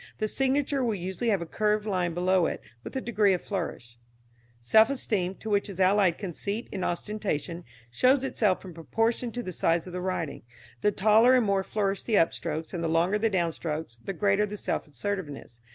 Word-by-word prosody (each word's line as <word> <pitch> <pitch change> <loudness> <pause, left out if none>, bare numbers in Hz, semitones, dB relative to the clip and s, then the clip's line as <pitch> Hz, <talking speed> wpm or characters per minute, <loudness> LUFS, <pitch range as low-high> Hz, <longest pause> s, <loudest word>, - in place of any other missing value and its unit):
The 215 - 0
signature 270 +3 +1
will 230 -3 0
usually 190 +6 -2
have 195 -5 +1
a - - -7
curved 210 +4 0
line 180 -5 -1
below 180 0 +3
it, - - -3 0.2
with - - -8
a 265 - -1
degree 215 -5 +2
of 180 - -2
flourish. 120 - -5 0.6
Self 220 - +5
esteem, 195 -9 -1
to 220 - -11
which 205 0 +1
is 190 -2 -8
allied 190 -2 +4
conceit 200 +4 -4
and 190 -2 -3
ostentation, 175 -4 -2 0.3
shows 255 - +3
itself 210 -8 0
in 180 - -8
proportion 225 +8 -1
to 245 - -3
the 185 - -5
size 165 -1 +1
of 180 - -9
the 180 - -3
writing, 180 -5 -3 0.4
the 210 - +3
taller 220 +5 +5
and 250 -3 +3
more 195 -1 +1
flourished 200 -1 -2
the 225 - +2
upstrokes 160 0 0
and 170 -2 -3
the - - +1
longer 170 +6 +2
the 225 +1 +2
downstrokes, 160 - -2
the 195 - -4
greater 200 +2 +2
the 210 +1 -6
self - - -2
assertiveness. 145 -5 -5
195 Hz, 195 wpm, -27 LUFS, 170-215 Hz, 0.6 s, Self